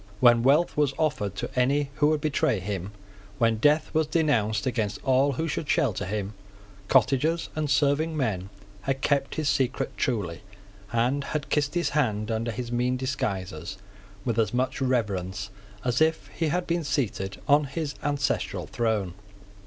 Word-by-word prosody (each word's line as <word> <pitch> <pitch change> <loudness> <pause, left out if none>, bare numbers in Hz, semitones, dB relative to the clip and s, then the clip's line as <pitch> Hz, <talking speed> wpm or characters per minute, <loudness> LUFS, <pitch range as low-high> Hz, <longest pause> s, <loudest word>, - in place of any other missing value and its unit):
When 120 -2 +6
wealth 145 +7 +3
was 145 -2 +1
offered 145 - 0
to - - -3
any 135 +3 +2
who 150 - +4
would 155 -1 +1
betray 140 -7 +1
him, 95 0 -4 0.5
when 115 -1 +2
death 150 +6 +3
was 155 -1 +2
denounced 115 -10 +1
against 110 -5 -1
all 135 +2 +3
who 160 +6 -2
should 150 -1 -3
shelter 140 - +1
him, 100 +1 -3 0.5
cottagers 140 +6 +2
and 155 -1 -1
serving 145 +3 +2
men 100 -9 -1 0.3
had 135 +4 -2
kept 140 -1 +1
his 155 -2 -1
secret 135 -1 0
truly, 100 -10 -1 0.5
and 125 +5 +1
had 145 0 -4
kissed 145 +1 +1
his 175 - +1
hand 110 -7 0
under 110 +1 -1
his 120 +1 -4
mean 125 +1 +1
disguises 100 - -3 0.5
with 115 -2 0
as 110 +1 +1
much 130 +2 -1
reverence 100 -6 -1 0.3
as 125 +3 +1
if 160 0 +2
he 165 - -2
had 175 +4 0
been 170 0 0
seated 100 -9 -2
on 145 0 +5
his 140 +1 -3
ancestral 145 0 -1
throne. 110 -6 -1
130 Hz, 160 wpm, -26 LUFS, 110-145 Hz, 0.5 s, When